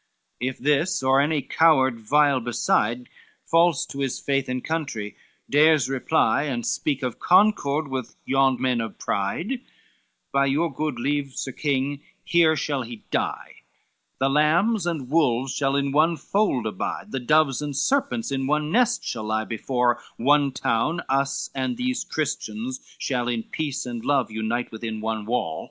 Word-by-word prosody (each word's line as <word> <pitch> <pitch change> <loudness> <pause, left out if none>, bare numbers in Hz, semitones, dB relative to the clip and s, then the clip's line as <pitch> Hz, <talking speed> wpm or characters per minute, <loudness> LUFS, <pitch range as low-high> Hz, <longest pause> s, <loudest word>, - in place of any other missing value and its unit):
LI 125 - 0
"If 130 - -4
this, 150 +3 +1
or 135 +1 +4
any 150 -1 0
coward 135 -6 +3
vile 140 +4 +3
beside, 120 0 0 0.4
False 165 -2 +3
to 140 - -8
his 135 -2 -1
faith 135 -2 -1
and 125 0 -3
country, 140 -11 -3 0.3
dares 150 -3 +4
reply; 140 +2 +2
And 120 -5 -3
speak 140 -2 -1
of 125 -3 -3
concord 175 -6 +3
with 130 -3 -5
yon 135 -2 +2
men 125 -2 +1
of 110 -2 -6
pride, 175 - -2 0.7
By 140 0 +2
your 155 +3 0
good 150 -3 -3
leave, 140 +1 -1
Sir 135 - -4
King, 140 +1 -1 0.2
here 165 -2 +4
shall 145 -2 -1
he 120 -2 -8
die, - - -2 0.6
The 135 - +1
lambs 170 +8 +2
and 155 -7 -2
wolves 130 -4 +1
shall 135 0 0
in 140 0 0
one 160 +3 +3
fold 175 - 0
abide, 105 -4 -4
The 135 - -2
doves 140 +1 +2
and 145 -1 -4
serpents 265 - 0
in 135 -1 -1
one 150 +1 0
nest 245 +3 +2
shall 110 -3 -4
lie, 110 0 -1
Before 120 +1 0 0.2
one 140 +2 +3
town 130 +5 0
us 135 +1 0
and 130 -2 -2
these 255 +1 -1
Christians 130 -4 -3 0.2
shall 125 -3 -1
In 120 -2 -1
peace 145 0 -4
and 120 -2 -5
love 135 -5 +1
unite 110 +2 -2
within 110 -1 -5
one 110 -1 -3
wall." 110 -10 -1
135 Hz, 160 wpm, -24 LUFS, 120-150 Hz, 0.7 s, or